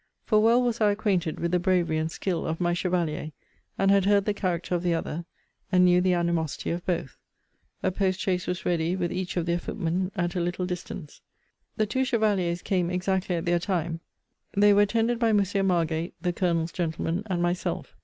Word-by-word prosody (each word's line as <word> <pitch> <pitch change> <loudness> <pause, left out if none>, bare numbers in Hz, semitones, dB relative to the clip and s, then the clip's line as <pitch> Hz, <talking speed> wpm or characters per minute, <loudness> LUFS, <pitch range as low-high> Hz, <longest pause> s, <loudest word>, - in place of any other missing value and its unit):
For 215 - +3
well 235 +3 +4
was 235 -2 -1
I 210 - +5
acquainted 190 -6 0
with 170 0 -1
the 180 - +3
bravery 175 -3 +1
and 160 +1 -2
skill 180 -1 -2
of 160 0 -2
my 175 -1 +1
chevalier; 170 -4 -1 0.4
and 195 0 +3
had 200 -1 +4
heard 200 0 +3
the 210 - +1
character 180 -3 -2
of 175 - +1
the 175 -1 +1
other; 165 +1 -4 0.5
and 180 -1 +5
knew 180 0 +5
the 180 0 +3
animosity 170 -3 -1
of 175 +1 -3
both. 170 -7 -2 0.7
A - - +2
post 190 0 0
chaise 180 -2 -1
was 180 +1 -3
ready, 170 0 +1
with 175 -2 -2
each 185 0 -3
of 170 - 0
their 170 0 0
footmen, 180 +1 -2
at 175 -2 -1
a - - 0
little 175 +1 -1
distance. 180 -3 -6 0.6
The 215 - +2
two 260 +5 0
chevaliers 200 -8 +1
came 180 -4 0
exactly 185 0 0
at 165 - -3
their 175 0 +2
time: 170 -3 -2 0.6
they 205 0 +6
were 205 - +5
attended 230 +3 +1
by 230 -2 +3
Monsieur 200 -1 +2
Margate, 170 -3 0
(the 175 +1 -1
Colonel's 170 -2 0
gentleman,) 165 +1 -2
and 185 -3 -1
myself. 175 +1 -2
180 Hz, 200 wpm, -26 LUFS, 170-195 Hz, 0.7 s, they